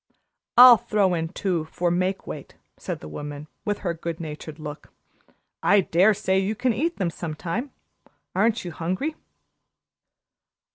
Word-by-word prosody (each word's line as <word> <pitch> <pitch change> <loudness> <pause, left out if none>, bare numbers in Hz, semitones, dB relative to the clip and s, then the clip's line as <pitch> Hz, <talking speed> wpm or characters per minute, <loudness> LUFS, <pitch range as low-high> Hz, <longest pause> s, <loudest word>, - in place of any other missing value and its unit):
"I'll 245 -1 +11
throw 200 -3 +1
in 165 -1 -1
two 180 -3 -1
for 175 +2 -1
make 185 +2 0
weight," - - -8 0.2
said - - -6
the - - -8
woman, 145 - -7 0.2
with 205 -1 -1
her 170 - +1
good 165 0 -5
natured 155 -1 -7
look. 150 -2 -8 0.7
"I 205 0 +5
dare 190 +5 +4
say 190 0 +1
you 195 +3 -1
can 245 +2 +1
eat 330 +9 -1
them 180 -3 -1
some 160 -2 -5
time. 215 - -3 0.6
Aren't 220 +2 +1
you 175 - -4
hungry?" 185 - -2
180 Hz, 150 wpm, -25 LUFS, 165-210 Hz, 0.7 s, I'll